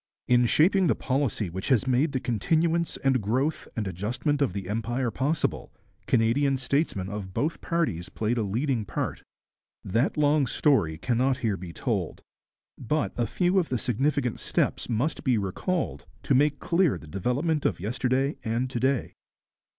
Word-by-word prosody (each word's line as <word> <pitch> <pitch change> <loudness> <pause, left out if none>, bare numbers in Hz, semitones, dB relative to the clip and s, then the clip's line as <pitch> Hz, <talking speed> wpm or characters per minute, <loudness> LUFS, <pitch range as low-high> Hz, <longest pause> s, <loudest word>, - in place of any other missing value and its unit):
In 120 -1 +4
shaping 185 - +4
the - - +3
policy 130 -6 -1
which 95 +9 -4
made 130 +4 +2
the 130 - -1
continuance 160 - 0
and 135 -3 +3
growth 130 +9 -1
and 110 -4 -2
adjustment 115 - -2
of 140 - +2
the 95 0 -5
Empire 115 +4 -1
possible, 145 +7 -1 0.4
Canadian 130 +4 +2
statesmen 130 - -1
of 95 -2 -6
both 155 +3 -1
parties 130 - -1
played 115 +2 -1
a - - +1
leading 115 +4 0
part. - - -3 0.6
That 115 +11 0
long 145 -2 +3
story 110 - +2
cannot 130 - +1
here 105 -3 +1
be 90 -2 -8
told, - - -3 0.6
but 150 +5 -1
a 120 -1 0
few 180 - +2
of 175 - -1
the 125 - 0
significant 125 +1 0
steps - - -1
must 125 +7 -1
be 125 -4 +2
recalled, 105 - -2 0.2
to 140 - +1
make 145 +2 +3
clear 170 -1 +2
the - - -12
development 125 - -1
of - - 0
yesterday 130 - 0
and 120 +3 -1
to 120 - -2
day. 130 +1 0
130 Hz, 160 wpm, -27 LUFS, 110-145 Hz, 0.6 s, In